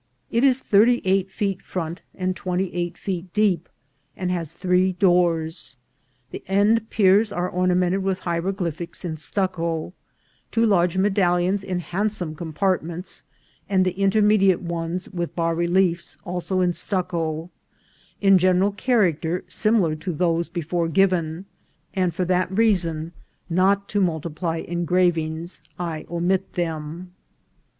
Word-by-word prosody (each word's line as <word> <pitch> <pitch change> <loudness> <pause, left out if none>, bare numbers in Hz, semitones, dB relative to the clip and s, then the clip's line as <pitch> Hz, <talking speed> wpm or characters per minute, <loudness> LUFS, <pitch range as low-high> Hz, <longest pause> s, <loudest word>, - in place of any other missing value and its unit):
It 235 +2 +2
is 260 -2 +5
thirty 240 0 +4
eight 190 0 +2
feet 195 -1 -2
front 170 0 -5
and 185 0 -1
twenty 185 0 -2
eight 175 0 -3
feet 180 -2 -4
deep, 210 -4 +2 0.5
and 180 -1 -2
has 165 -4 -3
three 185 +2 +1
doors. 175 -5 +1 0.5
The - - -7
end 210 +4 +2
piers 205 +1 +4
are 180 -2 -1
ornamented 180 +1 +1
with 190 -1 -1
hieroglyphics 170 -1 -3
in 160 -2 -3
stucco, 170 0 -2 0.6
two 230 0 +2
large 180 -4 +2
medallions 190 -1 +2
in 185 -2 -2
hand 200 +5 -1
some 175 -7 -4
compartments, 175 +2 -3 0.5
and 190 -2 +3
the 185 - +1
intermediate 195 0 +3
ones 170 +1 -3
with 175 -3 -4
bas 165 -1 0
reb'efs, 175 0 +1
also 180 +1 -1
in 180 -1 +2
stucco; 170 -2 -2 0.7
in 195 -2 +5
general 185 +2 +3
character 180 - +1
similar 215 -8 +2
to 175 +3 -4
those 170 0 0
before 170 0 -2
given, 175 -1 +1 0.5
and 185 -4 0
for 185 0 0
that 185 +1 +1
reason, 175 -7 +1 0.4
not 195 +3 +2
to 205 - +1
multi 170 -3 0
ply 165 +1 -3
engravings, 170 -2 0 0.2
I 165 -3 -4
omit 180 +3 -1
them. 165 +1 -4
180 Hz, 130 wpm, -23 LUFS, 170-195 Hz, 0.7 s, is